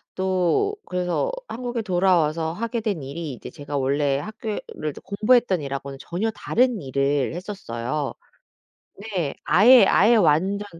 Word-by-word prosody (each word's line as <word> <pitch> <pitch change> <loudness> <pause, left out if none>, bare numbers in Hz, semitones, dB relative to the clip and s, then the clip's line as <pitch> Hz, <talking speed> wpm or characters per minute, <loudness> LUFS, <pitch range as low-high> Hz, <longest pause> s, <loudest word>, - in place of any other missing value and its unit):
또 190 - +1
그래서 180 - -1 0.2
한국에 240 -1 -4
돌아와서 175 -5 +1
하게 230 +6 -3
된 205 -8 -2
일이 150 +2 -5
이제 125 - -9
제가 145 0 -6
원래 140 +1 +1
학교에 215 +4 -5 0.2
를 155 0 -3
공부했던 210 -2 +2
일하고는 140 -1 -5
전혀 195 +6 -2
다른 245 -2 0
일을 140 +1 0
했었어요. 150 - -4 1.0
네. 160 -6 -1
아예, 215 +7 +7
아예 225 +5 +5
완전 195 +3 +2
180 Hz, 285 characters per minute, -23 LUFS, 145-215 Hz, 1.0 s, 아예